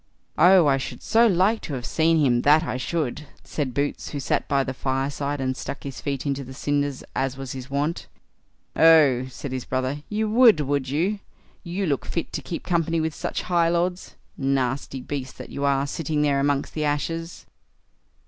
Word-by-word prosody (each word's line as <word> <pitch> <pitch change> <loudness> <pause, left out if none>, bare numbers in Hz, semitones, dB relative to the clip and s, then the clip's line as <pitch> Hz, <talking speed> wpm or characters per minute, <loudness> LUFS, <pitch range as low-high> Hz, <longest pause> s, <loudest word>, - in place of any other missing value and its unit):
"Oh! 180 +1 +7
I 140 -2 +4
should 135 - -6
so 230 +2 +4
like 200 +3 +2
to 145 - -5
have 125 -2 -5
seen 165 0 +2
him, 125 -6 +3
that 150 +4 +5
I 130 - -3
should", 150 0 -3 0.2
said 135 -5 -3
Boots, 145 0 -2
who 145 - -4
sat 130 - -1
by 140 -1 +2
the 130 - -4
fireside, 140 +2 -2
and 130 -1 -1
stuck 140 - -6
his 135 -2 -7
feet 140 -1 -3
into 140 -1 -1
the 130 0 -10
cinders, 145 -1 -1
as 135 0 -1
was 135 -2 -6
his 130 0 -7
wont. 145 +4 -2 0.7
"Oh!" 150 -6 +5
said 130 +2 -7
his 130 -1 -3
brothers, 130 +3 -2
"you 215 +1 -1
would, 225 -4 +6
would 140 -2 -1
you? 180 +9 0 0.4
You; 185 +2 -2
look 140 -5 -1
fit 170 - -3
to 150 - -3
keep 165 +5 -6
company 165 -2 0
with 160 0 -1
such - - -4
high 170 -2 +2
lords, 175 +1 -1 0.2
nasty 135 -1 -1
beast 135 0 -5
that - - -9
you 140 - -2
are, 140 0 +2
sitting 150 +1 -1
there 140 -2 +2
amongst 140 0 0
the 155 - -2
ashes." 165 +3 -3
145 Hz, 190 wpm, -24 LUFS, 135-165 Hz, 0.7 s, Oh